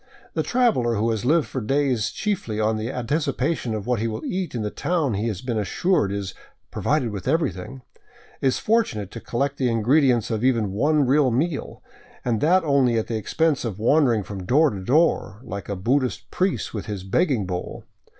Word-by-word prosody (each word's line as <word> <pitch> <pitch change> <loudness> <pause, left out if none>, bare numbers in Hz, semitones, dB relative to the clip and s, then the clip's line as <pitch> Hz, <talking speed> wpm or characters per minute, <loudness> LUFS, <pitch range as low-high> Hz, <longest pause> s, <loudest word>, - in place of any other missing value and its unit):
The - - 0
traveler 225 - +2
who 110 +2 +1
has 110 0 -2
lived 155 +3 +3
for 130 - -4
days 130 -2 +1
chiefly 195 - -2
on 110 +1 +1
the 110 +3 -3
anticipation 135 -1 -1
of 105 -2 -5
what 125 -3 0
he 115 - 0
will 110 -1 -5
eat 185 -6 -3
in 115 - -2
the 105 - -3
town 160 -8 0
he 105 +3 -1
has 105 -2 -4
been 120 -4 -1
assured 105 - +1
is 100 -2 -4 0.4
provided 135 -6 0
with 100 0 -6
everything," 130 - -1 0.6
is 130 -2 +2
fortunate 115 - 0
to 115 - -7
collect 140 +5 -2
the 130 -2 +1
ingredients 120 +1 +2
of 110 0 -1
even 115 -6 +2
one 145 +8 +2
real 135 +1 +3
meal, 145 +5 -2 0.4
and 115 -3 0
that 185 +4 +4
only 135 -6 +3
at 110 - 0
the 115 - -3
expense 150 +7 0
of 110 -6 -4
wandering 120 -1 +3
from 95 -1 -7
door 145 - +3
to 100 - -5
door, 135 - +2
like 100 -7 -7
a 100 - -2
Buddhist 125 +7 -1
priest 185 +1 -1
with 105 - -5
his 100 -3 -4
begging 120 - +1
bowl. 90 -1 -5
120 Hz, 190 wpm, -23 LUFS, 110-145 Hz, 0.6 s, that